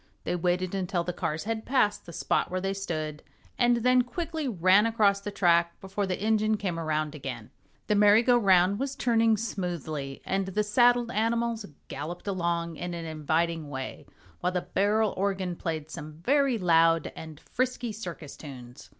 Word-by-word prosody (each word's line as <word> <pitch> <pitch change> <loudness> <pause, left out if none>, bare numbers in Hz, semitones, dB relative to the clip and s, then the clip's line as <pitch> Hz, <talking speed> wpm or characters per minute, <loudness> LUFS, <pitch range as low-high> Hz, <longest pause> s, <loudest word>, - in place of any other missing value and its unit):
They - - -1
waited 180 +1 0
until 185 -2 -1
the 180 +1 -3
cars 155 -2 -3
had 220 +1 -3
passed 250 -9 +1
the - - -8
spot - - 0
where 185 - -2
they 195 +1 -1
stood 155 -6 -4 0.4
and 240 -1 +4
then 250 0 +5
quickly 320 +4 -4
ran 195 0 +4
across 205 -3 +2
the 205 - -4
track 170 -4 +2
before 195 +1 -3
the 185 - -2
engine 215 +1 +2
came 185 -5 -3
around 155 -2 -1
again. 130 -7 -7 0.3
The - - +1
merry 210 +2 +6
go 245 0 +4
round 195 -3 +4
was 275 0 -2
turning 225 -2 +3
smoothly, 170 -10 -4
and 195 0 -1
the 210 +3 0
saddled 240 +2 +3
animals 230 0 0 0.2
galloped 160 +5 -6
along 170 -3 -1
in 175 0 -4
an 165 -1 -5
inviting 160 0 -1
way, 130 -2 -6 0.3
while 180 - 0
the 180 -1 -1
barrel 210 +3 +1
organ 190 -2 -1
played 160 -2 -4
some 150 +1 -7
very 265 - +2
loud 165 -3 +3
and 160 -2 -9
frisky 250 +1 -2
circus 175 -8 -7
tunes. 125 -3 -11
185 Hz, 170 wpm, -28 LUFS, 165-220 Hz, 0.4 s, merry